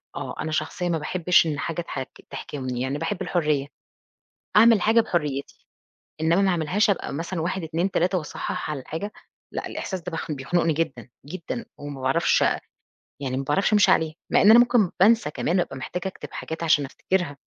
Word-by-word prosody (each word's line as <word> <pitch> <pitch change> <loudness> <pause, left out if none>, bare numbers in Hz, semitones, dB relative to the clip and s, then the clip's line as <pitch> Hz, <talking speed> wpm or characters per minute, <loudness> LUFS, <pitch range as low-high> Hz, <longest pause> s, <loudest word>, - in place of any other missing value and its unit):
آه، - - -5
أنا 155 - -3
شخصيّة 155 +3 -2
ما 165 - +1
باحبش 175 +3 +3
إن 150 -2 -2
حاجة 165 +2 -2
تحك 135 -5 -6 0.2
تحكمني، 130 -2 -5
يعني 130 +2 -1
باحب 165 +5 -3
الحريّة، 150 -5 0 0.9
أعمل 225 0 +7
حاجة 220 +4 +4
بحريتي، 150 -10 -3 0.6
إنّما 165 +4 +3
ما 195 - +3
أعملهاش 180 +5 +1
أبقى 195 - -1
مثلًا 165 +3 -3
1 175 +2 -2
2 170 +4 -1
3 185 +2 +1
وأصحّح 155 -1 -4
على 150 - -3
الحاجة، 160 +10 -5 0.4
لأ، - - -3
الإحساس 190 -2 -5
ده 180 - -6
بيخ 165 -1 -4
بيخنقني 160 +4 0
جدًا، 135 -6 -3 0.2
جدًا، 185 - -5
وما 145 -2 -7
باعرفش 135 +6 +2 0.8
يعني 130 -2 -3
ما 135 - -2
باعرفش 190 +10 +1
أمشي 210 -1 +5
عليه، 160 -1 +2 0.2
مع - - +4
إن 205 - +6
أنا 235 - +9
ممكن 240 -6 +4
بانسى 215 -4 +4
كمان 175 +4 0
وأبقى 170 -6 -2
محتاجة 180 +8 -4
أكتب 190 - -8
حاجات 160 +1 -5
عشان 150 -3 +3
أفتكرها، 165 +1 -2
165 Hz, 180 wpm, -24 LUFS, 145-185 Hz, 0.9 s, أنا